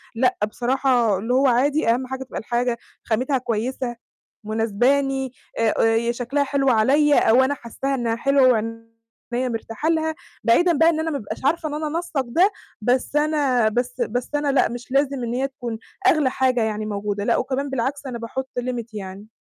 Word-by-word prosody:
لأ 255 +2 +2
بصراحة، 245 -3 +1
اللي 225 +6 -2
هو 265 +2 +4
عادي 265 +2 +2
أهم 255 +2 +1
حاجة 265 0 -5
تبقى 255 - -6
الحاجة 240 +1 -1 0.3
خاماتها 255 +4 0
كويسة، 240 +1 -2 0.5
مناسباني، 255 +5 +1 0.3
آآ 225 -1 +2
يا 225 +1 +2
شكلها 250 +4 -1
حلو 275 -1 +1
عليّا، 280 +6 +4
أو 255 +4 +6
أنا 270 - +1
حاسّاها 270 +3 -3
إنها 235 -2 -1
حلوة، 275 +2 +4
وعينيا 230 +2 -3
مرتاحة 225 +6 -3
لها، 320 -1 0 0.3
بعيدًا 340 +9 +4
بقى 325 +1 +6
إن 315 - 0
أنا 320 0 -1
ما 285 - -1
أبقاش 250 +1 -7
عارفة 315 +2 +1
إن 295 - -6
أنا 305 0 -2
أنسّق 315 -3 -2
ده، 345 - +3 0.3
بس 250 +5 0
أنا 290 -6 +2
بس 245 +2 -2
بس 240 +2 -2
أنا 290 -1 +1
لأ، 270 - +3
مش 240 +2 -8
لازم 275 -2 +1
إن 235 - -2
هي 265 +2 0
تكون 240 -4 -6 0.3
أغلى 305 -8 +4
حاجة 255 -3 +1
يعني 215 -1 -2
موجودة. 205 -1 -3
لأ، - - +2
وكمان 270 +2 -2
بالعكس 270 +2 -2
أنا 240 -3 -5
باحط 260 +3 -5
limit 245 -2 -3
يعني. 200 0 -7
255 Hz, 180 wpm, -22 LUFS, 230-275 Hz, 0.5 s, أو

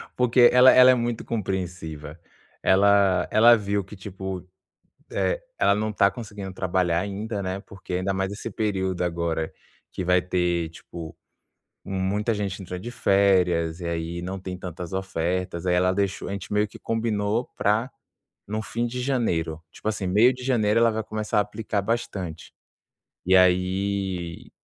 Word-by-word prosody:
porque 125 0 +5
ela 125 +1 +8
ela 130 0 +8
é - - +4
muito 120 -1 -2
compreensiva. 90 -7 -4 0.4
Ela 100 -2 +4
ela 120 +2 +7
viu 100 -1 -1
que 95 +3 -12
tipo, 95 -1 -6 0.6
eh, - - 0 0.2
ela 100 - +4
não 110 +1 -1
está 100 -2 +3
conseguindo 100 -5 -7
trabalhar 90 -2 0
ainda, 100 +2 -4
né, 95 +1 -3
porque 95 -3 -10
ainda 95 +2 -1
mais 95 +1 -1
esse 110 +3 -6
período 95 -4 -1
agora, 85 -2 -2 0.4
que - - -4
vai 90 +1 +3
ter, 90 -2 0
tipo, 80 0 -10 0.7
muita 100 +4 -1
gente 100 -2 -3
entra 90 0 -6
de 120 - -6
férias 90 -6 +2
e 85 - -4
aí, 85 +1 -3
não 95 +2 -4
tem 90 -1 -6
tantas 90 -1 -7
ofertas. 90 -1 -2
Aí, 90 - +3
ela 90 +1 +3
deixou 100 0 -2
a - - -4
gente 100 0 -6
meio 105 +1 +2
que - - -13
combinou 115 0 -1
pra 110 +4 +1 0.6
no 110 +2 -3
fim 120 +3 -2
de 125 +2 -4
janeiro, 85 - -1
tipo 105 - -6
assim, 105 -3 -2
meio 105 +7 +5
de 125 0 -10
janeiro, 115 -4 +2
ela 115 - +5
vai 110 0 -2
começar 110 -1 -2
a - - +6
aplicar 105 0 -3
bastante. 100 -6 -3 0.8
E 95 +1 +4
aí, 90 -1 0
95 Hz, 160 wpm, -25 LUFS, 90-110 Hz, 0.8 s, ela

